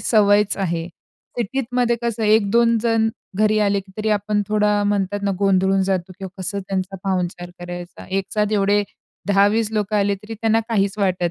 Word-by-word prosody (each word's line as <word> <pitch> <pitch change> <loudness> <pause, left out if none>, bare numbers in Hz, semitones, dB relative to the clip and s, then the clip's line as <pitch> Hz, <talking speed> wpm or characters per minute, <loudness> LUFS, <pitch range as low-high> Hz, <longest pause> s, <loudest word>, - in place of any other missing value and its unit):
सवयच 205 -2 +3
आहे. 170 -4 -2 0.5
सिटीतमध्ये 245 +1 0
कसं 235 -1 -2
एक 210 -1 +3
दोन 235 +1 +4
जण 225 -1 +2 0.3
घरी 215 0 +3
आले, 200 -1 +2 0.2
तरी 215 0 -2
आपण 205 0 +1
थोडा 210 -1 +2
म्हणतात 205 0 -1
ना 200 - +1
गोंधळून 195 -1 +2
जातो 185 -1 -1
किंवा 190 0 -8
कसं 200 +2 -3
त्यांचा 190 0 -3
पाहुणचार 180 -2 -2
करायचा. 175 0 -8
एक 195 +1 -1
साथ 210 0 +1
एवढे 205 0 +3 0.5
10-20 205 +2 +3
लोकं 210 -1 0
आले 200 0 +2
तरी 210 +3 -9
त्यांना 225 +1 +1
काहीच 200 -2 0
वाटत 185 -3 +1
205 Hz, 165 wpm, -21 LUFS, 195-215 Hz, 0.5 s, दोन